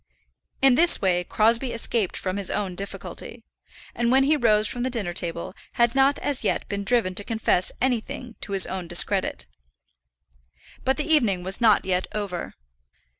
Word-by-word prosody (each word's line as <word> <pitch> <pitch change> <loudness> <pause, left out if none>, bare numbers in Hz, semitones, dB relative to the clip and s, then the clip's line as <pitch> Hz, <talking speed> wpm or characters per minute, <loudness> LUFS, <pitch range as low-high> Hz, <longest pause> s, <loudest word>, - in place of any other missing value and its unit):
In 270 -2 +6
this 335 +7 +4
way 180 -3 +1
Crosbie 230 +6 +1
escaped 230 -3 0
from 185 0 -3
his 200 -2 -2
own 195 -3 -2
difficulty; 195 +3 -6 0.5
and 235 0 0
when 265 +1 +4
he 300 +3 +3
rose 215 -6 +2
from 245 - -4
the 255 - -1
dinner 210 -8 -3
table 170 0 -4 0.2
had 235 0 +2
not 270 +1 +3
as 285 -3 -3
yet - - -1
been 200 -1 -4
driven 205 -3 +1
to 205 - -2
confess 220 -4 0
anything 245 -1 -3
to 200 - -5
his 195 -1 +6
own 185 -2 -5
discredit. - - +2 1.4
But 265 +1 +1
the 300 - -2
evening 230 - +2
was 190 +5 -2
not 220 -3 +4
yet 185 -1 0
over. 200 -5 -5
215 Hz, 170 wpm, -24 LUFS, 190-245 Hz, 1.4 s, In